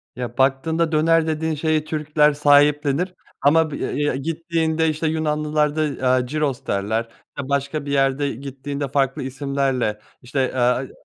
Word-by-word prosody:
Ya, 125 +1 -6
baktığında 160 +5 +1
döner 160 +1 +3
dediğin 160 0 -1
şeyi 155 0 0
Türkler 150 -1 +2
sahiplenir 145 +3 +3 0.3
ama 160 +2 +4
bi - - -4
ya - - -2
ya, 145 -2 0
gittiğinde 160 +2 -1
işte 155 +1 -1
Yunanlılar 150 -1 0
da, 145 -4 -1
aaa, 130 0 +4
gyros 140 +1 -2
derler, 110 +4 -1 0.3
eee, 140 0 -5
başka 140 +1 -1
bir 140 - -4
yerde 135 +1 +1
gittiğinde 140 +2 -5
farklı 135 -1 0
isimlerle 135 -5 -1 0.2
işte, 130 +1 -1
eee, 125 +1 +1
145 Hz, 145 wpm, -21 LUFS, 135-155 Hz, 0.3 s, ama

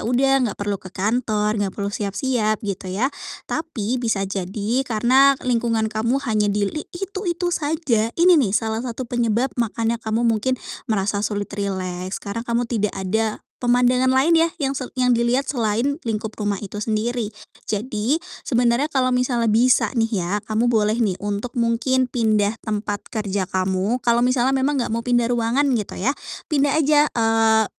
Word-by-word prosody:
udah 265 +2 +3 0.2
nggak - - -6
perlu 205 -1 -3
ke 185 - -10
kantor, 210 +1 0
nggak 195 -2 -2
perlu 200 -1 -3
siap-siap 215 +2 0
gitu 195 -1 -4
ya. 230 +10 -1 0.3
Tapi 255 -7 -3
bisa 220 -5 0
jadi 200 +5 -2
karena 260 +5 +4
lingkungan 230 -2 +1
kamu 230 +4 +1
hanya 215 -4 +1
di 205 0 +1
li 305 +10 -3
itu-itu 360 -2 -2
saja, 290 -9 0
ini 340 -2 +6
nih 205 -4 +2
salah 220 +1 -1
satu 250 +1 -4
penyebab 240 +1 0
makanya 230 0 -1
kamu 225 +1 -1
mungkin 230 +4 +1 0.3
merasa 205 -3 0
sulit 205 -1 -2
rileks, 185 -2 -3
karena 215 +3 -4
kamu 235 +1 +1
tidak 210 -3 0
ada 215 +3 -1 0.2
pemandangan 250 +1 +3
lain 290 +6 +4
ya 330 +1 +4
yang 270 0 0
se 260 - -4
yang 250 -1 +2
dilihat 235 +3 +2
selain 235 +2 0
lingkup 220 -1 -2
rumah 205 -2 -1
itu 205 +1 -7
sendiri. 220 +1 -1 0.3
Jadi 225 +7 -1 0.3
sebenarnya 240 +2 +2
kalau 260 -2 +2
misalnya 250 -2 +1
bisa 245 +4 +4
nih 225 -4 +1
ya, 170 - -3 0.2
kamu 225 +2 +1
boleh 215 -1 +2
nih 195 -5 0
untuk 205 +5 -4
mungkin 250 +3 +2
pindah 215 -3 +2
tempat 210 -1 -3
kerja 200 -4 -2
kamu. 190 +5 0
Kalau 235 0 +4
misalnya 255 +1 +2
memang 275 +2 +1
enggak 240 - -1
mau 230 - -1
pindah 240 -1 +2
ruangan 240 +4 +1
gitu 215 -4 -3
ya, 250 +9 +1 0.3
pindah 285 -1 +1
aja, 300 0 +4
eee, 225 -1 +3
230 Hz, 165 wpm, -22 LUFS, 210-255 Hz, 0.3 s, ini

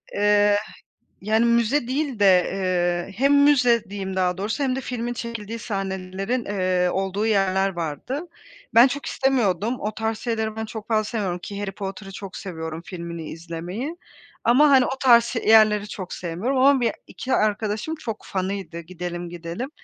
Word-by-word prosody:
Eee, 205 0 +4
h 215 - -12 0.4
yani, 220 +3 +2
müze 235 +3 +2
değil 270 -3 -1
de, 205 - +3 0.2
eee, 180 -1 -1
hem 280 +4 +4
müze 250 -5 +4
diyeyim 190 -2 -5
daha 180 -1 +1
doğrusu 220 +8 -2
hem 255 -1 0
de 270 - -2
filmin 240 -1 -3
çekildiği 230 -2 -5
sahnelerin, 195 +3 -3
eee, 185 -2 +1
olduğu 195 +2 -1
yerler 195 -2 +2
vardı. 185 - -4 0.5
Ben 235 +3 +9
çok 280 +2 -4
istemiyordum. 235 -4 +1
O 210 0 -3
tarz 220 0 -2
şeyleri 220 -2 -2
ben 220 - -3
çok 220 0 -8
fazla 215 -2 +2
sevmiyorum, 205 -5 -2
ki 200 +3 -7
Harry 200 -1 -3
Potter'ı 195 0 -7
çok 195 -1 -8
seviyorum 160 -3 -6
filmini 170 -3 -7
izlemeyi 175 - -6 0.5
ama, 275 +6 +5
hani, 260 -2 +6
o 265 - -3
tarz 235 -3 +6
şe 235 -1 -3
yerleri 215 -2 +5
çok 185 -3 -7
sevmiyorum 185 +10 -2
ama 270 0 +5
be 230 -3 +1
2 260 - -5
arkadaşım 215 +6 0
çok 230 -9 -6
fanıydı, 190 -2 -4
"Gidelim, 175 0 -6
gidelim." 175 - -6
210 Hz, 165 wpm, -23 LUFS, 185-235 Hz, 0.5 s, Ben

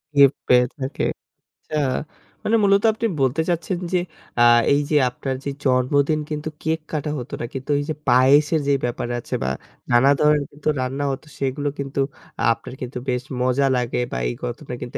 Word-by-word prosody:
Gift 140 -1 +6
পেয়ে 125 0 +6
থাকে। 130 +1 -3 0.6
আচ্ছা, 155 - -5 0.7
মানে 225 - +2
মূলত 200 0 +4
আপনি 225 +2 -3 0.2
বলতে 135 +4 +2
চাচ্ছেন 175 +1 -1
যে - - +4 0.4
আ - - +6 0.3
এই 145 - +3
যে 155 - +1
আপনার 130 +2 -4
যে - - -1 0.2
জন্মদিন 140 +4 +2
কিন্তু 150 0 -3
কেক 160 +1 0
কাটা 150 -1 -2
হতো 125 +2 -8
না। 120 - -2
কিন্তু 135 +2 -4
এই - - -1
যে - - +1 0.2
পায়েসের 145 +5 +5
যে 140 - +4
ব্যাপার 120 0 -3
আছে - - -4
বা 65 - 0 0.4
নানা 120 +3 +5
ধরনের 150 -1 +3 0.3
রান্না 135 +3 -2
হত 135 0 -5 0.2
সেগুলো 140 +2 -1
কিন্তু 140 0 -3 0.5
আপনার 115 - -5
কিন্তু 125 0 -5
বেশ 125 0 0 0.2
মজা 130 +2 +2
লাগে 125 -1 -1
বা - - -2
এই - - -4
কথাটা 125 +2 -5
কিন্তু 125 - -5
140 Hz, 175 wpm, -22 LUFS, 125-150 Hz, 0.7 s, Gift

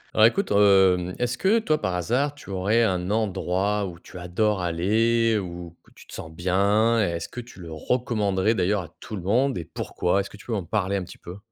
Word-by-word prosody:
Alors 110 0 +7
écoute, 195 - -1
hem, 95 -3 +4
est-ce 125 0 -2
que 205 +4 +3
toi, 155 -9 0
par 95 -3 -1
hasard, 130 - 0
tu 145 - -11
aurais 100 +5 +2
un 90 -3 0
endroit 100 -1 0
où 85 -2 -9
tu 90 - -11
adores 95 +3 0
aller 110 +6 +2
ou 85 -2 -7
que - - -23
tu - - -15
te - - -15
sens 80 - -8
bien? 100 +7 +2
Est-ce 85 -5 -1
que 125 - -7
tu 120 -5 -15
le 85 -2 -9
recommanderais 105 +1 0
d'ailleurs 100 -1 0
à 85 - -11
tout 110 - -7
le 95 - -6
monde 125 +8 +1
et 85 - -5
pourquoi? 90 +3 -1
Est-ce 100 - -3
que - - -13
tu 105 - -16
peux - - -6
m'en 100 -4 -1
parler 100 +1 -1
un 95 - -3
petit - - -12
peu? 90 +2 -10
100 Hz, 225 wpm, -24 LUFS, 90-115 Hz, -, Alors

